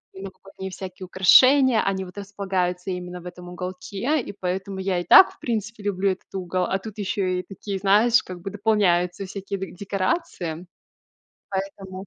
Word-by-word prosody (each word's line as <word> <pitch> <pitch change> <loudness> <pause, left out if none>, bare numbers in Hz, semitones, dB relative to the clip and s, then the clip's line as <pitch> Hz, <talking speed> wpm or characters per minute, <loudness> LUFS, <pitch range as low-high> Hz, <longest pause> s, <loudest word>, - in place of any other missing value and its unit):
новогодние 190 0 -9
всякие 185 0 -8
украшения. 255 +6 +6
Они 190 -1 -1
вот 180 +2 -13
располагаются 190 -2 -2
именно 180 0 -5
в - - -16
этом 180 0 -10
уголке, 190 - -3
и - - -7
поэтому 190 +2 -3
я 190 -2 0
и 175 - -5
так, 380 - +8
в - - -27
принципе, 220 -2 -3
люблю 195 -1 +1
этот 185 - -9
угол. 185 0 -1
А 190 - 0
тут 215 +1 -9
ещё 195 -1 -1
и 180 0 0
такие, 195 +1 -6
знаешь, 210 +5 +4
как 180 -1 -9
бы 195 - -5
дополняются 195 -3 +1
всякие 195 +1 -5
де 190 - -5
декорации. 190 - -3 0.8
Поэтому 190 0 -5
190 Hz, 165 wpm, -24 LUFS, 180-200 Hz, 0.8 s, так